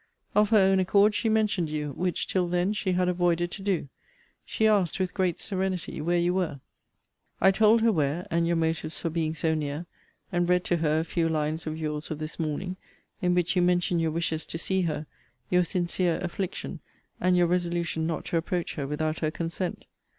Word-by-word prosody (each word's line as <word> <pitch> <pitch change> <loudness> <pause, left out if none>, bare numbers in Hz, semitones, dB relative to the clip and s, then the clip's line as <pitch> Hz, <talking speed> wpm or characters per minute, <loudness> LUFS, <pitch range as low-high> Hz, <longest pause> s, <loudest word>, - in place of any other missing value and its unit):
Of 210 0 +4
her 220 - +5
own 190 -1 +5
accord 200 +3 +4
she 225 +2 0
mentioned 215 -6 +1
you; 150 -1 -3
which, 180 +5 -1
till 180 -2 0
then, 180 +3 +1
she 195 -3 -1
had 180 0 +2
avoided 175 -1 +1
to 200 - -7
do. 190 -7 0 0.6
She 220 - -1
asked, 200 -5 +3
with 185 -1 -1
great 185 -4 0
serenity, 190 -5 -2
where 175 +3 +1
you 175 +1 +2
were? 175 -7 -1 0.8
I 190 - +6
told 220 +3 +5
her 230 - +5
where, 155 -1 0
and 170 0 +2
your 170 - +2
motives 160 -1 -1
for 165 - -2
being 160 -1 -1
so 160 +1 +1
near; 150 +1 -3 0.5
and 175 -1 +1
read 180 0 +3
to 175 - +1
her 155 -1 +2
a - - -4
few 165 -1 0
lines 155 +1 -1
of 155 0 -3
your's 150 -1 -4
of 155 - -3
this 155 +2 -6
morning, 175 +4 -2 0.4
in 180 0 +2
which 175 -1 +1
you 180 - +4
mention 175 -1 +2
your 165 -1 +1
wishes 160 0 -1
to - - -4
see 190 +3 0
her, 155 -3 -2 0.5
your 180 0 +5
sincere 175 0 0
affliction, 180 +1 -4 0.4
and 180 0 +3
your 175 - +5
resolution 170 -2 0
not 165 - -3
to 170 - 0
approach 175 +1 -2
her 140 -3 -4
without 155 +2 -2
her 155 - 0
consent. 170 +3 -4
175 Hz, 200 wpm, -27 LUFS, 160-185 Hz, 0.8 s, I